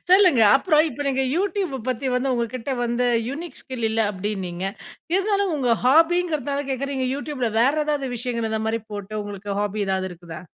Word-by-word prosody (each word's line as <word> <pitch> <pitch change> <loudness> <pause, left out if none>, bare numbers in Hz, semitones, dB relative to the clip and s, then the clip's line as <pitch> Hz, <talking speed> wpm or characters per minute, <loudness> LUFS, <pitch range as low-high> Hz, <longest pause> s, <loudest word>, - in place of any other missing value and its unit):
சொல்லுங்க. 370 - +6 0.2
அப்புறம் 305 +3 +3
இப்ப 290 - -5
நீங்க 265 -1 +1
Youtube 390 0 0
ப 265 - -4
பத்தி 255 +1 -1
வந்து, 260 +1 +1
உங்கக்கிட்ட 240 +2 -3
வந்து 240 +1 0 0.2
யுனிக் 320 +5 -6
ஸ்கில் 250 -4 -3
இல்ல 225 +1 +1
அப்பிடின்னீங்க. 190 -2 -4 0.5
இருந்தாலும் 395 -1 +1
உங்க 245 -5 +2
ஹாபிங்கறதனால 305 -1 +3
கேக்குறீங்க 265 0 -2
Youtube 285 -2 -5
ல - - 0
வேற 260 +4 +4
ஏதாவது 290 -3 -1
விஷயங்கள் 235 -2 -2
இந்த 220 0 -1
மாதிரி 225 +1 0
போட்டு 205 +1 -6
உங்களுக்கு 205 0 -6
ஹாபி 205 +1 -2
எதாவது 190 0 0
இருக்குதா? 165 -2 -10
255 Hz, 170 wpm, -23 LUFS, 220-295 Hz, 0.5 s, சொல்லுங்க